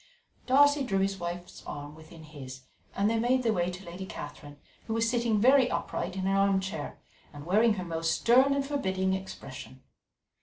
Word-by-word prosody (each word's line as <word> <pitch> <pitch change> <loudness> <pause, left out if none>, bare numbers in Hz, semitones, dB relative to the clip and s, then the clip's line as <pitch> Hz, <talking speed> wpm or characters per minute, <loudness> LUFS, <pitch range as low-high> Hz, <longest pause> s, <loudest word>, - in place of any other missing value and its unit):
Darcy 285 +2 +5
drew 195 -7 -1
his 195 0 0
wife's 175 +1 -6
arm 145 0 -7
within 160 +1 -14
his, 135 -4 -10 0.3
and 200 - +2
they 225 +1 +1
made 255 +2 +2
their 225 -2 +2
way 175 -2 0
to 180 +2 -8
Lady 180 +2 -7
Catherine, 145 -2 -9 0.3
who 225 - -2
was 225 0 +1
sitting 235 -2 +1
very 260 +3 +5
upright 180 -6 -3
in 190 -1 -3
an 195 0 +2
armchair 190 -5 0 0.3
and 145 -1 -10
wearing 215 +5 +3
her 185 -2 -5
most 165 -1 -1
stern 260 +4 +5
and 280 -1 -1
forbidding 190 -10 -1
expression. 135 -8 -8
190 Hz, 180 wpm, -29 LUFS, 165-235 Hz, 0.3 s, Darcy